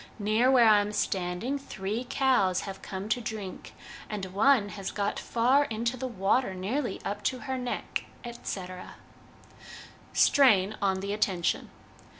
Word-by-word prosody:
Near 215 Hz, +4 st, +2 dB
where 250 Hz, -3 st, +6 dB
I 210 Hz, -1 st, +7 dB
am 205 Hz, +1 st, -4 dB
standing 195 Hz, +7 st, -1 dB
three 220 Hz, -1 st, -4 dB
cows 225 Hz, -11 st, +2 dB
have 195 Hz, -1 st, -7 dB
come 190 Hz, +1 st, -6 dB
to 245 Hz, +3 st, +1 dB
drink, 215 Hz, -5 st, -7 dB, 0.3 s
and 210 Hz, -3 st, -4 dB
one 220 Hz, 0 st, +4 dB
has 195 Hz, -1 st, -5 dB
got 205 Hz, 0 st, -2 dB
far 255 Hz, +5 st, +2 dB
into 235 Hz, +1 st, -2 dB
the 260 Hz, +1 st, -4 dB
water, 195 Hz, -1 st, +1 dB
nearly 215 Hz, +5 st, -2 dB
up 205 Hz, +1 st, -3 dB
to 255 Hz, -, -1 dB
her 265 Hz, -2 st, -3 dB
neck,' 250 Hz, -1 st, -3 dB, 0.2 s
etc. 190 Hz, -6 st, -7 dB, 1.2 s
Strain 215 Hz, -7 st, +4 dB
on 190 Hz, -1 st, +1 dB
the 200 Hz, +1 st, -3 dB
Attention. 190 Hz, -4 st, 0 dB
210 Hz, 145 wpm, -28 LUFS, 195-250 Hz, 1.2 s, I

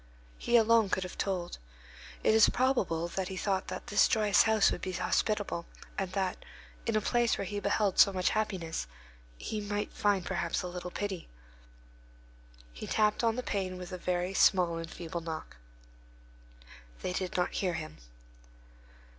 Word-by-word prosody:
He 240 Hz, -, +3 dB
alone 225 Hz, -2 st, +4 dB
could 190 Hz, -, 0 dB
have 180 Hz, -, -7 dB
told. 180 Hz, -, -3 dB, 0.6 s
It -, -, +4 dB
is 220 Hz, -1 st, +7 dB
probable 200 Hz, -11 st, +1 dB
that 190 Hz, +1 st, -3 dB
he 190 Hz, -1 st, -6 dB
thought 190 Hz, -1 st, -1 dB
that -, -, -6 dB
this 205 Hz, -, +4 dB
joyous 210 Hz, -2 st, +4 dB
house 220 Hz, -2 st, +4 dB
would -, -, -4 dB
be 185 Hz, -, -3 dB
hospitable, 200 Hz, -1 st, -1 dB, 0.3 s
and 190 Hz, -2 st, -2 dB
that, 190 Hz, -2 st, -2 dB, 0.4 s
in 230 Hz, -, +1 dB
a 215 Hz, -, +3 dB
place 240 Hz, +2 st, +2 dB
where 200 Hz, -, -3 dB
he 205 Hz, +2 st, -3 dB
beheld 200 Hz, -1 st, +1 dB
so 200 Hz, -, +8 dB
much 185 Hz, -1 st, +1 dB
happiness, 185 Hz, -, -2 dB, 0.5 s
he 215 Hz, -, -4 dB
would 205 Hz, 0 st, -3 dB
find 200 Hz, -3 st, +1 dB
perhaps 170 Hz, +1 st, -1 dB
a -, -, -3 dB
little 180 Hz, 0 st, -6 dB
pity. 190 Hz, -1 st, -4 dB, 1.4 s
He -, -, -7 dB
tapped 210 Hz, +1 st, +2 dB
on 225 Hz, -1 st, +2 dB
the 250 Hz, -, -3 dB
pane 190 Hz, -4 st, -2 dB
with 180 Hz, 0 st, -8 dB
a 185 Hz, -, -4 dB
very 180 Hz, +1 st, -1 dB
small 180 Hz, -4 st, +4 dB
and 165 Hz, 0 st, -6 dB
feeble 170 Hz, 0 st, -6 dB
knock. 160 Hz, -, -6 dB, 1.5 s
They 180 Hz, -, -2 dB
did 185 Hz, 0 st, -2 dB
not 180 Hz, -, 0 dB
hear 180 Hz, -3 st, -1 dB
him. 155 Hz, -1 st, -6 dB
190 Hz, 165 wpm, -31 LUFS, 180-210 Hz, 1.5 s, so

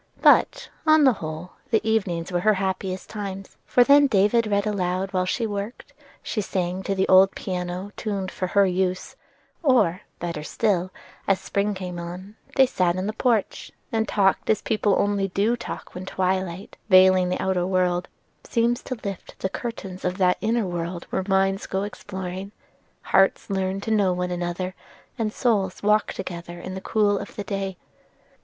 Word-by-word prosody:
But, -, -, +5 dB, 0.2 s
on 310 Hz, -1 st, +6 dB
the 260 Hz, -3 st, +6 dB
whole, 155 Hz, +3 st, -6 dB, 0.2 s
the 225 Hz, -1 st, +1 dB
evenings 185 Hz, -6 st, 0 dB
were 175 Hz, -, +1 dB
her 215 Hz, +3 st, +3 dB
happiest 190 Hz, -1 st, -3 dB
times: 195 Hz, -2 st, -6 dB
for 245 Hz, -, +5 dB
then 285 Hz, +2 st, +6 dB
David 215 Hz, 0 st, +3 dB
read 200 Hz, 0 st, +1 dB
aloud 190 Hz, -1 st, -1 dB
while 185 Hz, -1 st, +1 dB
she 230 Hz, +5 st, 0 dB
worked; 205 Hz, +2 st, -5 dB, 0.3 s
she 215 Hz, -, -2 dB
sung 185 Hz, -1 st, -2 dB
to 195 Hz, 0 st, -2 dB
the 190 Hz, -, +1 dB
old 190 Hz, +1 st, +6 dB
piano 180 Hz, +1 st, -4 dB
tuned 200 Hz, -3 st, -3 dB
for 185 Hz, -, -3 dB
her 200 Hz, +2 st, +4 dB
use; 185 Hz, 0 st, -1 dB, 0.5 s
or, 240 Hz, -, +3 dB, 0.2 s
better 170 Hz, -3 st, -4 dB
still, 185 Hz, +2 st, 0 dB, 0.4 s
as 195 Hz, -1 st, +3 dB
spring 200 Hz, +1 st, -1 dB
came 180 Hz, -2 st, -5 dB
on, 180 Hz, +4 st, -8 dB, 0.2 s
they 265 Hz, -, +7 dB
sat 180 Hz, -8 st, +1 dB
in 185 Hz, +1 st, -2 dB
the 215 Hz, -, -2 dB
porch, 230 Hz, -4 st, 0 dB, 0.2 s
and 220 Hz, -1 st, 0 dB
talked 195 Hz, -2 st, +2 dB
as 220 Hz, -, +2 dB
people 210 Hz, -2 st, +1 dB
only 200 Hz, -1 st, +1 dB
do 205 Hz, +5 st, +1 dB
talk 240 Hz, -, -7 dB
when 185 Hz, +1 st, -7 dB
twilight, 185 Hz, 0 st, -2 dB
veiling 185 Hz, -1 st, +6 dB
the 180 Hz, -, -1 dB
outer 185 Hz, -2 st, 0 dB
world, 180 Hz, -1 st, +1 dB, 0.4 s
seems 235 Hz, +2 st, +1 dB
to 255 Hz, -, -5 dB
lift 195 Hz, -3 st, -6 dB
the 190 Hz, -, -2 dB
curtains 195 Hz, -4 st, -6 dB
of 180 Hz, 0 st, -1 dB
that 180 Hz, -2 st, +2 dB
inner 225 Hz, 0 st, +1 dB
world 175 Hz, -1 st, -4 dB
where -, -, 0 dB
minds 195 Hz, 0 st, +1 dB
go 190 Hz, +1 st, -1 dB
exploring, 190 Hz, -1 st, -6 dB, 0.5 s
hearts 195 Hz, +1 st, +2 dB
learn 190 Hz, 0 st, -1 dB
to 220 Hz, -, -4 dB
know 200 Hz, -4 st, +3 dB
one 180 Hz, 0 st, -2 dB
another, 175 Hz, +1 st, -3 dB, 0.5 s
and 215 Hz, -2 st, 0 dB
souls 205 Hz, -7 st, 0 dB
walk 210 Hz, +1 st, +3 dB
together 175 Hz, -2 st, -7 dB
in 185 Hz, +2 st, -6 dB
the 190 Hz, -, -6 dB
cool 205 Hz, -1 st, +2 dB
of -, -, -9 dB
the 205 Hz, -, -4 dB
day. 195 Hz, -2 st, -3 dB
190 Hz, 175 wpm, -24 LUFS, 180-210 Hz, 0.5 s, they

